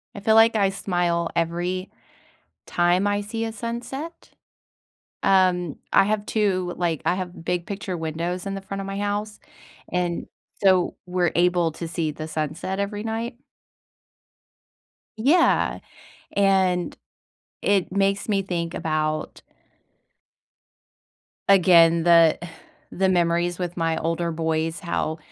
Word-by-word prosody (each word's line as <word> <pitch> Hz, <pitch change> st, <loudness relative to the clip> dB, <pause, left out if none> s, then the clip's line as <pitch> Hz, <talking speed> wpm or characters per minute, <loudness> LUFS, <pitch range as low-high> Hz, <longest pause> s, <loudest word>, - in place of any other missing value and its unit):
I -, -, -6 dB
feel 220 Hz, +2 st, +3 dB
like 225 Hz, 0 st, +6 dB
I 200 Hz, -2 st, +3 dB
smile 175 Hz, -3 st, -1 dB
every 175 Hz, +3 st, -1 dB, 0.8 s
time 175 Hz, +3 st, +2 dB
I 205 Hz, 0 st, 0 dB
see 225 Hz, +2 st, -4 dB
a 225 Hz, -, -3 dB
sunset. 240 Hz, +9 st, -6 dB, 0.9 s
Um, 185 Hz, -4 st, +2 dB, 0.2 s
I 195 Hz, -, +7 dB
have 210 Hz, 0 st, -1 dB
2, 185 Hz, -5 st, 0 dB
like 170 Hz, -4 st, -1 dB
I -, -, +2 dB
have 180 Hz, -3 st, -6 dB
big 175 Hz, 0 st, -1 dB
picture 195 Hz, -1 st, -4 dB
windows 170 Hz, +3 st, -3 dB
in 195 Hz, 0 st, -3 dB
the 195 Hz, -, -5 dB
front 195 Hz, 0 st, -5 dB
of 195 Hz, -, -6 dB
my 195 Hz, 0 st, -4 dB
house, 205 Hz, +1 st, -3 dB, 0.5 s
and 175 Hz, -1 st, -1 dB, 0.4 s
so 185 Hz, -2 st, +4 dB
we're 180 Hz, -1 st, 0 dB
able 175 Hz, -1 st, +2 dB
to 170 Hz, -, -6 dB
see 160 Hz, -2 st, -2 dB
the 155 Hz, +1 st, -7 dB
sunset 155 Hz, +5 st, -3 dB
every 205 Hz, +1 st, -3 dB
night. 225 Hz, +2 st, -4 dB, 1.8 s
Yeah. 300 Hz, +10 st, +3 dB, 0.5 s
And 190 Hz, -3 st, +2 dB, 0.7 s
it 195 Hz, -3 st, +1 dB
makes 195 Hz, +2 st, 0 dB
me 200 Hz, -1 st, +2 dB
think 170 Hz, -3 st, -3 dB
about 155 Hz, -1 st, -2 dB, 2.1 s
again, 170 Hz, -3 st, +6 dB
the 170 Hz, -2 st, +6 dB, 0.5 s
the 190 Hz, 0 st, +1 dB
memories 175 Hz, -1 st, +1 dB
with 175 Hz, -1 st, -4 dB
my 165 Hz, -1 st, 0 dB
older 165 Hz, +1 st, -1 dB
boys, 160 Hz, 0 st, -1 dB
how 170 Hz, -3 st, -2 dB
180 Hz, 125 wpm, -24 LUFS, 170-200 Hz, 2.1 s, I